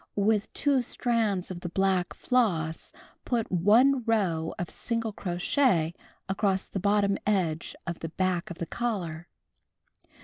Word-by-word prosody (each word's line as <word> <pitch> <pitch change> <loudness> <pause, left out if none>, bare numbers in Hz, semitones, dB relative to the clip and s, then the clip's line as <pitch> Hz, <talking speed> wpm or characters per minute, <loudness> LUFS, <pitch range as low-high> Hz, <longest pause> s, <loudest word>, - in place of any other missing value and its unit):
With 210 +1 +1
two 280 -3 +2
strands 225 -6 0
of 175 - -5
the 175 - -5
black 190 0 +1
floss 175 -11 0 0.3
put 235 -3 -1
1 230 +9 +4
row 185 -8 +1
of 175 - -4
single 230 -2 -2
crochet 175 - +1 0.3
across 195 0 0
the 195 - -4
bottom 200 0 +2
edge 175 -6 0
of 170 -1 -4
the 165 - -5
back 180 0 -1
of 175 - -7
the 170 - -3
collar. 175 -8 -3
195 Hz, 135 wpm, -28 LUFS, 175-225 Hz, 0.3 s, 1